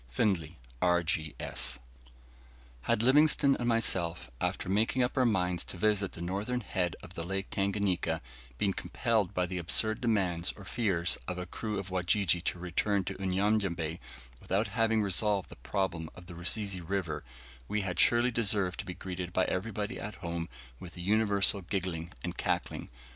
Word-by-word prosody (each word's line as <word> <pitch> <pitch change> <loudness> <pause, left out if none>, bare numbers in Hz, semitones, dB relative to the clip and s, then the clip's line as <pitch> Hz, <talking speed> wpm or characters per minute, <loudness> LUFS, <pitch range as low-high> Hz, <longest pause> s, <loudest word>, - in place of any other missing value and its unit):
Findlay, 85 - 0 0.2
R.G.S. 80 -7 +1 1.0
Had 105 - +1
Livingstone 140 +1 +5
and 120 - -2
myself, 85 - +2
after - - -1
making 110 +6 +2
up 125 - -1
our 130 -3 +4
minds 90 -5 +1
to - - -6
visit 100 0 +1
the 85 - -7
northern 105 +8 -2
head 90 -5 -1
of 85 - -10
the 85 - -4
Lake 95 +3 -3
Tanganika, 95 -4 0 0.4
been 100 +6 +1
compelled 110 -5 0
by 90 - +2
the 90 0 -3
absurd 110 +6 +3
demands 95 -7 +1
or 100 - -11
fears 90 -5 0
of 90 - -3
a 90 - -4
crew 105 +4 -4
of 95 -1 -5
Wajiji 90 -1 +2
to - - 0
return 90 +3 0
to 95 - -6
Unyanyembe 95 -4 0 0.4
without 100 +3 0
having 110 0 +2
resolved 100 0 +2
the - - -10
problem 90 -5 -2
of 90 - -12
the 90 - -9
Rusizi 95 +2 0
River, 85 -4 -2 0.4
we 105 +1 0
had 90 -2 -3
surely 120 +1 +5
deserved 100 -5 +1
to - - -5
be 90 - -5
greeted 90 -1 -5
by 95 - +2
everybody 105 +3 -2
at 105 0 -5
home 85 -1 -4 0.3
with 90 0 -10
a - - -5
universal 100 0 +3
giggling 90 -3 -3
and - - -3
cackling. - - -2
95 Hz, 165 wpm, -31 LUFS, 85-105 Hz, 1.0 s, Livingstone